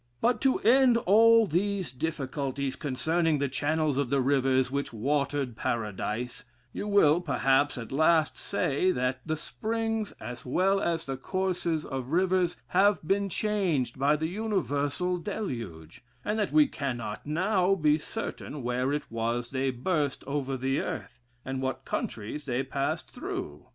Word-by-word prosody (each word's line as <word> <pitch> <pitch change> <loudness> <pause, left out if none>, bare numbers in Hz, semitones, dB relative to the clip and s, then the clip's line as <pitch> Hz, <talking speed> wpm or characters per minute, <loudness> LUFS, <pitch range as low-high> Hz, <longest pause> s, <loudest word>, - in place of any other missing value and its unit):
But 235 -1 +2
to 265 -1 +3
end 250 +1 +5
all 230 +2 +6
these 190 -2 -1
difficulties 140 -1 -3
concerning 160 +3 0
the 140 0 0
channels 150 +1 0
of 140 -4 0
the 140 +1 +2
rivers 130 -1 +2
which 140 +1 -2
watered 140 +1 -1
Paradise, 115 +2 -3 0.3
you 205 - -4
will, 175 -5 +5
perhaps, 140 -3 +2
at 115 -2 -7
last 155 +2 +3
say, 185 -2 0
that 125 +1 -1
the 155 0 -1
springs, 225 +4 -2
as 120 0 -7
well 190 +9 +2
as 165 -1 -1
the 135 -1 -4
courses 180 0 -1
of 135 +1 -5
rivers, 180 -1 +2
have 190 -3 +3
been 200 0 +1
changed 175 - 0
by 140 +2 +4
the 155 +1 -2
universal 180 -4 -1
deluge: 115 - -5 0.2
and 210 +2 0
that 210 - 0
we 305 -1 +6
cannot 120 - -4
now 185 +4 +2
be 150 -3 +3
certain 145 -2 -6
where 125 +2 0
it 150 +1 -1
was 115 +1 -2
they 135 0 0
burst 140 +2 -1
over 140 -1 -2
the 135 +2 0
earth, 120 - -5 0.3
and 130 0 -3
what 130 0 -3
countries 115 +7 -4
they 130 -1 -1
passed 135 +1 -2
through. 75 0 -6
145 Hz, 150 wpm, -28 LUFS, 130-185 Hz, 0.3 s, all